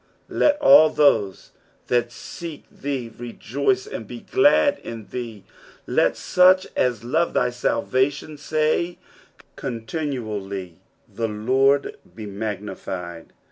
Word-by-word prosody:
16 -, -, -6 dB
Let 295 Hz, -1 st, +4 dB
ail 155 Hz, +3 st, +8 dB
those 110 Hz, -12 st, +2 dB, 0.3 s
that 120 Hz, -1 st, +1 dB
seek 165 Hz, +3 st, -8 dB
thee 130 Hz, -4 st, -4 dB
rejoice 380 Hz, -, -2 dB
and 430 Hz, -, -7 dB
be -, -, -8 dB
glad 290 Hz, -6 st, +3 dB
in 115 Hz, -2 st, -8 dB
thee: 115 Hz, -5 st, -6 dB, 0.4 s
let -, -, +2 dB
,such 185 Hz, +1 st, +4 dB
as 120 Hz, -3 st, 0 dB
love 160 Hz, +8 st, 0 dB
thy 125 Hz, 0 st, +2 dB
salvation 130 Hz, +4 st, -1 dB
say 155 Hz, +4 st, 0 dB, 0.6 s
continually, 110 Hz, -, -5 dB, 0.3 s
The 115 Hz, -1 st, -3 dB
Lord 130 Hz, +6 st, +1 dB, 0.2 s
be 110 Hz, -, -7 dB
magnified. 95 Hz, -4 st, -6 dB
125 Hz, 110 wpm, -23 LUFS, 110-155 Hz, 0.6 s, ail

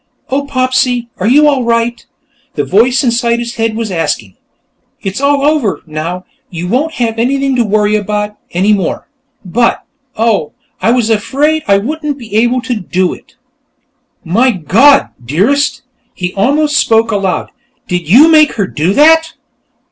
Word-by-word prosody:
"Oh, 280 Hz, +1 st, -1 dB
Popsy, 255 Hz, -2 st, 0 dB
are 190 Hz, -, -1 dB
you 295 Hz, +5 st, +5 dB
all 275 Hz, -4 st, +1 dB
right?" 235 Hz, 0 st, -1 dB, 0.5 s
the -, -, -1 dB
voice 245 Hz, +7 st, +2 dB
inside 235 Hz, -1 st, +1 dB
his 235 Hz, 0 st, -5 dB
head 225 Hz, -1 st, -1 dB
was 225 Hz, -2 st, -3 dB
asking. 150 Hz, -, -3 dB, 0.7 s
"It's 195 Hz, +6 st, -4 dB
all 280 Hz, 0 st, +2 dB
over, 295 Hz, -9 st, 0 dB
now; 165 Hz, +4 st, -5 dB, 0.2 s
you 175 Hz, 0 st, -5 dB
won't 285 Hz, -, -1 dB
have 230 Hz, -2 st, -2 dB
anything 270 Hz, +2 st, 0 dB
to 240 Hz, -, +3 dB
worry 210 Hz, 0 st, +1 dB
about, 210 Hz, 0 st, -2 dB
any 195 Hz, +5 st, +1 dB
more. 195 Hz, -4 st, -2 dB, 0.4 s
But, 235 Hz, +6 st, 0 dB, 0.3 s
oh, 215 Hz, -9 st, 0 dB, 0.3 s
I -, -, +2 dB
was 235 Hz, -2 st, +1 dB
afraid 290 Hz, +9 st, 0 dB
I 200 Hz, -1 st, +4 dB
wouldn't 295 Hz, +6 st, -3 dB
be 225 Hz, -5 st, -9 dB
able 240 Hz, +3 st, +2 dB
to 255 Hz, -, -2 dB
do 180 Hz, -1 st, -1 dB
it!" -, -, -16 dB, 0.9 s
"My 225 Hz, +10 st, +2 dB
God, 230 Hz, -, +3 dB
Dearest!" 205 Hz, -, 0 dB, 0.3 s
He 180 Hz, -1 st, -4 dB
almost 290 Hz, +8 st, +1 dB
spoke 225 Hz, 0 st, +2 dB
aloud. 195 Hz, -3 st, -2 dB, 0.4 s
"Did 175 Hz, -3 st, -3 dB
you 265 Hz, -, +7 dB
make 310 Hz, -2 st, +4 dB
her 200 Hz, -, -1 dB
do 170 Hz, +2 st, -1 dB
that?" 320 Hz, +5 st, +4 dB
230 Hz, 155 wpm, -12 LUFS, 195-275 Hz, 0.9 s, you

